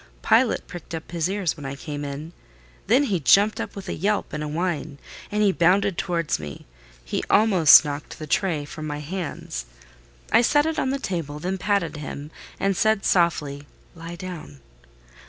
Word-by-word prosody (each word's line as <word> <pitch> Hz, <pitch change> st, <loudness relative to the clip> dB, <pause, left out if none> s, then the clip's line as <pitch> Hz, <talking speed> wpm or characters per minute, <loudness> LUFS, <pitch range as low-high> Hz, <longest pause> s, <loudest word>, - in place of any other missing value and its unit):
Pilot -, -, +3 dB
pricked 175 Hz, -1 st, -8 dB
up 160 Hz, +1 st, -8 dB
his 170 Hz, 0 st, -1 dB
ears 195 Hz, -4 st, -1 dB
when 150 Hz, -, -11 dB
I 135 Hz, 0 st, -5 dB
came 145 Hz, +1 st, -6 dB
in: 145 Hz, +4 st, -6 dB, 0.5 s
then 250 Hz, +7 st, +4 dB
he 200 Hz, -10 st, 0 dB
jumped 200 Hz, -, +4 dB
up -, -, -6 dB
with 200 Hz, -1 st, -8 dB
a -, -, -2 dB
yelp 205 Hz, +4 st, -1 dB
and 150 Hz, -, -3 dB
a -, -, -3 dB
whine, 155 Hz, -2 st, -2 dB, 0.3 s
and 210 Hz, -2 st, +2 dB
bounded 185 Hz, +2 st, +3 dB
towards 170 Hz, -, -1 dB
me: 75 Hz, -2 st, -8 dB, 0.4 s
he -, -, -2 dB
almost 190 Hz, -8 st, +7 dB
knocked 145 Hz, 0 st, -6 dB
the 155 Hz, -, -6 dB
tray 155 Hz, -2 st, 0 dB
from 155 Hz, +1 st, -7 dB
my 145 Hz, -1 st, -3 dB
hands. 150 Hz, -, -5 dB, 0.6 s
I -, -, +6 dB
set 290 Hz, +5 st, +3 dB
it 320 Hz, 0 st, -1 dB
on 260 Hz, -, 0 dB
the 275 Hz, -, 0 dB
table; 165 Hz, -, -4 dB
then 185 Hz, +5 st, -3 dB
patted 200 Hz, -6 st, 0 dB
him, 150 Hz, 0 st, -7 dB, 0.3 s
and 195 Hz, 0 st, +1 dB
said 220 Hz, +1 st, +2 dB
softly, 145 Hz, -5 st, +1 dB, 0.3 s
"Lie 165 Hz, +1 st, -8 dB
down!" 170 Hz, -, -8 dB
170 Hz, 175 wpm, -24 LUFS, 150-195 Hz, 0.6 s, almost